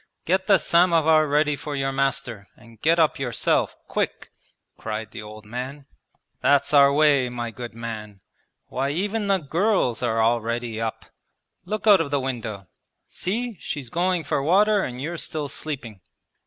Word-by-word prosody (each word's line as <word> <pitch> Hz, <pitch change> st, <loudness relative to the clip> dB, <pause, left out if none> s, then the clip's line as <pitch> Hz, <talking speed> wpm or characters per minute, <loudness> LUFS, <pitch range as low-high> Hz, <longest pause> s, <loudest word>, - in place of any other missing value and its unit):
get 190 Hz, +2 st, +1 dB
the 195 Hz, -, +6 dB
samovar 165 Hz, -3 st, +4 dB
ready 150 Hz, +1 st, +2 dB
for 145 Hz, +1 st, -6 dB
your 135 Hz, -1 st, -1 dB
master, 135 Hz, -6 st, -2 dB
and 115 Hz, -1 st, -18 dB
get 165 Hz, +2 st, +3 dB
up 160 Hz, -4 st, +2 dB
yourself 125 Hz, -3 st, 0 dB
quick,' -, -, -3 dB, 0.4 s
cried 110 Hz, -1 st, -5 dB
the -, -, -7 dB
old 105 Hz, 0 st, -11 dB
man. 130 Hz, +5 st, -6 dB, 0.6 s
'That's 140 Hz, +1 st, +3 dB
our 140 Hz, -1 st, +7 dB
way, 140 Hz, -3 st, +4 dB
my 120 Hz, -1 st, -4 dB
good 120 Hz, -1 st, -8 dB
man! 110 Hz, -3 st, -7 dB, 0.5 s
Why 135 Hz, +2 st, -2 dB
even 205 Hz, +7 st, -1 dB
the 195 Hz, -1 st, +3 dB
girls 170 Hz, -, 0 dB
are 115 Hz, -2 st, 0 dB
already 115 Hz, 0 st, 0 dB
up! 115 Hz, -1 st, -4 dB, 0.6 s
Look 215 Hz, +1 st, -4 dB
out 205 Hz, -5 st, +7 dB
of 155 Hz, -, -3 dB
the 140 Hz, 0 st, +1 dB
window. 115 Hz, -7 st, -4 dB, 0.4 s
See, 225 Hz, +4 st, -4 dB
she's 135 Hz, -6 st, -6 dB
going 180 Hz, 0 st, +1 dB
for 140 Hz, -, -1 dB
water 200 Hz, +7 st, +4 dB
and 125 Hz, 0 st, -5 dB
you're 165 Hz, +5 st, -4 dB
still 155 Hz, -2 st, -4 dB
sleeping!' 120 Hz, -10 st, -6 dB
140 Hz, 155 wpm, -24 LUFS, 115-165 Hz, 0.6 s, our